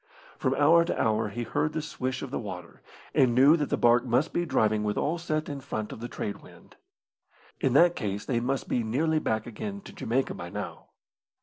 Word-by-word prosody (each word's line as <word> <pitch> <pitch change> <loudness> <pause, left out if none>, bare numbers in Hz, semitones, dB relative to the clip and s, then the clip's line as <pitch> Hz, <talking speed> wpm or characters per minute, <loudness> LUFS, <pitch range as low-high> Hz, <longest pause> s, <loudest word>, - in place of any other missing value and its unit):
From - - +1
hour 165 +4 +5
to 170 - -2
hour 110 -1 +1
he 120 +4 -4
heard 150 +6 -1
the 160 - -1
swish 130 -4 -4
of - - -6
the - - -2
water, - - -8 0.3
and 120 -3 +4
knew 140 +5 +7
that 150 -4 -1
the - - +1
barque 120 0 +4
must 130 +5 +1
be 175 0 0
driving 110 -6 +2
with 105 0 -1
all 165 +3 0
set 155 -2 -2
in 145 -2 -5
front 110 -5 -4
of - - -8
the 120 - -5
trade 100 -4 -4
wind. - - -17 0.8
In 130 - +1
that 175 +5 +5
case 105 -4 -3
they 120 -3 0
must 130 +3 -2
be 120 - 0
nearly 155 +8 +1
back 110 -6 -1
again 200 - -6
to - - -12
Jamaica 130 +4 -1
by 85 - -7
now. - - -6
130 Hz, 215 wpm, -28 LUFS, 110-155 Hz, 0.8 s, knew